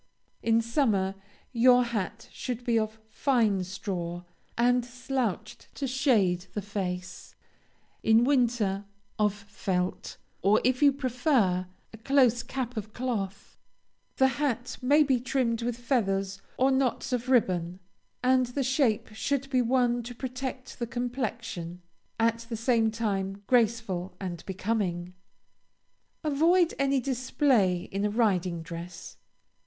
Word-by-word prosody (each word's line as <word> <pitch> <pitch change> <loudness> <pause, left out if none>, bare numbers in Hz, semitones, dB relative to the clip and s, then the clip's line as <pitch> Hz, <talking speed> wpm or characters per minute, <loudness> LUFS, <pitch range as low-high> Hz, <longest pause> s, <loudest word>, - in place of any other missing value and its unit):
In 225 0 +3
summer, 225 -6 +1 0.4
your 250 +1 +6
hat 230 -1 -4
should 250 -2 -5
be 230 -2 +3
of 215 0 -3
fine 220 -5 +1
straw, 180 -2 -4 0.3
and 245 +1 +3
slouched 245 -3 -3
to 280 - -3
shade 215 - +2
the 210 - -1
face; 185 -3 -5 0.7
in 225 +1 +5
winter, 235 -7 +1 0.3
of 210 -1 +4
felt, 190 -2 -3 0.2
or, 205 +2 +4
if 255 +1 +2
you 285 -1 +7
prefer, 250 - +1 0.3
a - - -9
close 245 -1 +3
cap 250 -1 -4
of 215 0 -5
cloth. 220 -6 -4 0.6
The 265 - +5
hat 250 -2 -1
may 290 +4 +5
be 265 -4 +2
trimmed 240 -2 0
with 235 0 -2
feathers 195 -6 0 0.2
or 265 +1 +3
knots 265 0 0
of 250 +1 -2
ribbon, 180 -8 +2 0.4
and 255 0 +4
the 270 +3 -2
shape 260 -4 +1
should 275 +4 -2
be 255 -2 +3
one 245 0 +2
to 240 +1 -8
protect 255 +1 -5
the 235 - -2
complexion, 230 -8 -4 0.4
at 230 0 +1
the 230 - -3
same 230 -1 +2
time 200 -3 -2
graceful 220 -7 +1
and 175 -3 -5
becoming. 185 -3 -2 1.1
Avoid 330 +4 +3
any 275 0 +2
display 250 -7 +1
in 195 +1 -2
a 210 - +2
riding 185 -6 +1
dress. 170 +1 -8
230 Hz, 125 wpm, -28 LUFS, 195-255 Hz, 1.1 s, you